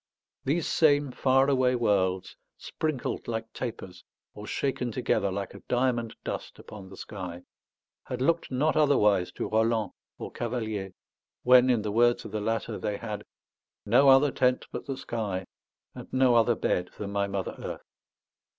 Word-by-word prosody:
These 155 Hz, +4 st, 0 dB
same 145 Hz, -3 st, +3 dB
far 135 Hz, +1 st, +3 dB
away 130 Hz, -2 st, +3 dB
worlds, 95 Hz, -5 st, 0 dB, 0.2 s
sprinkled 155 Hz, -5 st, -3 dB
like 115 Hz, -1 st, -4 dB
tapers 100 Hz, -7 st, -6 dB, 0.3 s
or 105 Hz, 0 st, -9 dB
shaken 130 Hz, -3 st, -2 dB
together 115 Hz, -5 st, 0 dB
like 100 Hz, +1 st, -4 dB
a -, -, -11 dB
diamond 120 Hz, -2 st, 0 dB
dust -, -, -5 dB
upon 100 Hz, -3 st, -11 dB
the 95 Hz, -, -12 dB
sky, 90 Hz, -3 st, -7 dB, 0.6 s
had 125 Hz, -2 st, -5 dB
looked 165 Hz, +6 st, +1 dB
not 145 Hz, +5 st, +1 dB
otherwise 105 Hz, -11 st, +3 dB
to -, -, -3 dB
Roland 110 Hz, -2 st, +1 dB, 0.3 s
or -, -, -7 dB
Cavalier, 110 Hz, -5 st, -3 dB, 0.5 s
when, 125 Hz, 0 st, +6 dB
in 120 Hz, -4 st, +2 dB
the 105 Hz, -, -2 dB
words 120 Hz, +2 st, +3 dB
of -, -, -7 dB
the 110 Hz, 0 st, -3 dB
latter, 115 Hz, 0 st, -2 dB
they 105 Hz, -1 st, -2 dB
had 105 Hz, -2 st, -5 dB, 0.6 s
"no 125 Hz, +6 st, +5 dB
other 135 Hz, +1 st, +6 dB
tent 125 Hz, -1 st, +1 dB
but -, -, -6 dB
the 135 Hz, -1 st, -3 dB
sky, 100 Hz, -7 st, -3 dB, 0.5 s
and -, -, -10 dB
no 130 Hz, -1 st, +4 dB
other 115 Hz, 0 st, +4 dB
bed 90 Hz, -3 st, -1 dB
than 100 Hz, -1 st, -5 dB
my 100 Hz, 0 st, 0 dB
mother 100 Hz, -1 st, -3 dB
earth." -, -, -6 dB
115 Hz, 160 wpm, -28 LUFS, 100-130 Hz, 0.6 s, when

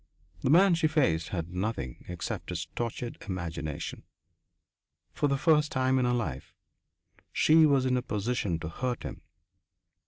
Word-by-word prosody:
The -, -, 0 dB
man 180 Hz, +5 st, +6 dB
she 165 Hz, -1 st, +3 dB
faced 110 Hz, -, +1 dB
had 85 Hz, -1 st, -4 dB
nothing 90 Hz, -, -3 dB
except 90 Hz, -1 st, -5 dB
his 90 Hz, 0 st, -3 dB
tortured 120 Hz, 0 st, -4 dB
imagination. 85 Hz, -5 st, -4 dB, 1.1 s
For 145 Hz, -, +1 dB
the 140 Hz, -1 st, +1 dB
first 150 Hz, 0 st, +3 dB
time 130 Hz, 0 st, +2 dB
in 125 Hz, -, +2 dB
her 125 Hz, -, +2 dB
life 115 Hz, -, -3 dB, 0.8 s
she 155 Hz, 0 st, +5 dB
was 140 Hz, -3 st, +3 dB
in 130 Hz, -1 st, +2 dB
a 125 Hz, -, +1 dB
position 105 Hz, -5 st, -1 dB
to 85 Hz, -, -4 dB
hurt 125 Hz, +9 st, -3 dB
him. -, -, -7 dB
120 Hz, 150 wpm, -29 LUFS, 85-140 Hz, 1.1 s, man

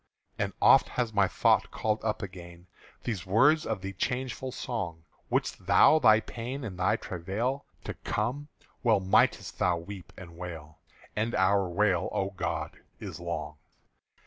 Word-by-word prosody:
_" -, -, +2 dB
And -, -, -3 dB
oft -, -, +7 dB
has 120 Hz, -3 st, -2 dB
my 100 Hz, -2 st, +4 dB
thought -, -, +2 dB
called 110 Hz, 0 st, -1 dB
up 110 Hz, -1 st, -1 dB
again 85 Hz, -2 st, -9 dB, 0.4 s
These 100 Hz, -7 st, -4 dB
words 140 Hz, +11 st, +4 dB
of 110 Hz, -4 st, -2 dB
the 95 Hz, 0 st, -5 dB
changeful 130 Hz, +5 st, -3 dB
song: 95 Hz, -11 st, -4 dB, 0.3 s
"Wist -, -, -1 dB
thou 155 Hz, -, +6 dB
thy 110 Hz, -5 st, +6 dB
pain 125 Hz, +5 st, -6 dB
and 95 Hz, -6 st, -6 dB
thy 90 Hz, -, +2 dB
travàil 105 Hz, +10 st, -3 dB, 0.2 s
To -, -, -4 dB
come, 125 Hz, +8 st, -3 dB, 0.3 s
well 115 Hz, -5 st, +4 dB
might'st 95 Hz, 0 st, +2 dB
thou 90 Hz, -1 st, +2 dB
weep 90 Hz, +1 st, -9 dB
and 85 Hz, -3 st, -11 dB
wail!" 80 Hz, -3 st, -8 dB, 0.4 s
And 110 Hz, +2 st, -1 dB
our 95 Hz, 0 st, +3 dB
wail, 95 Hz, -1 st, +1 dB
O 95 Hz, 0 st, -1 dB
God! 95 Hz, -, -4 dB, 0.2 s
is -, -, -7 dB
long. 75 Hz, 0 st, -4 dB
100 Hz, 155 wpm, -29 LUFS, 90-115 Hz, 0.4 s, oft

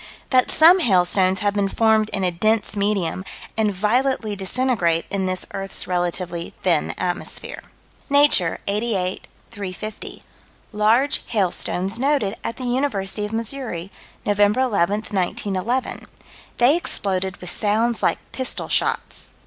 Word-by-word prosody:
That 255 Hz, -2 st, +4 dB
some 340 Hz, +4 st, +7 dB
hailstones 185 Hz, -, +3 dB
have 205 Hz, -1 st, +1 dB
been 200 Hz, -1 st, 0 dB
formed 220 Hz, 0 st, +2 dB
in 195 Hz, -, -1 dB
a 180 Hz, -, +2 dB
dense 215 Hz, +4 st, 0 dB
medium, 200 Hz, -3 st, -1 dB, 0.3 s
and 220 Hz, -2 st, +1 dB
violently 215 Hz, +2 st, 0 dB
disintegrate 190 Hz, -5 st, 0 dB
in 195 Hz, -2 st, -1 dB
this 185 Hz, 0 st, -2 dB
earth's 195 Hz, -1 st, -2 dB
relatively 175 Hz, -1 st, -2 dB
thin 170 Hz, -5 st, +1 dB
atmosphere: 175 Hz, -1 st, -2 dB, 0.5 s
Nature, 285 Hz, -, +4 dB
88 200 Hz, -3 st, -1 dB, 0.2 s
350: 200 Hz, +1 st, -7 dB, 0.5 s
Large 225 Hz, +6 st, +2 dB
hailstones 195 Hz, 0 st, -1 dB
noted 270 Hz, -7 st, +1 dB
at 230 Hz, -, -4 dB
the 255 Hz, -, -6 dB
University 240 Hz, -6 st, -1 dB
of 210 Hz, -, -6 dB
Missouri, 225 Hz, -5 st, -4 dB, 0.3 s
Nov. 205 Hz, -1 st, 0 dB
11, 205 Hz, +2 st, +4 dB, 0.5 s
1911: 200 Hz, +5 st, -2 dB, 0.5 s
they 250 Hz, +5 st, +5 dB
exploded 190 Hz, -, -1 dB
with 180 Hz, -1 st, -6 dB
sounds 220 Hz, +4 st, +1 dB
like -, -, +2 dB
pistol 260 Hz, -1 st, -4 dB
shots. -, -, -1 dB
205 Hz, 125 wpm, -22 LUFS, 185-235 Hz, 0.5 s, some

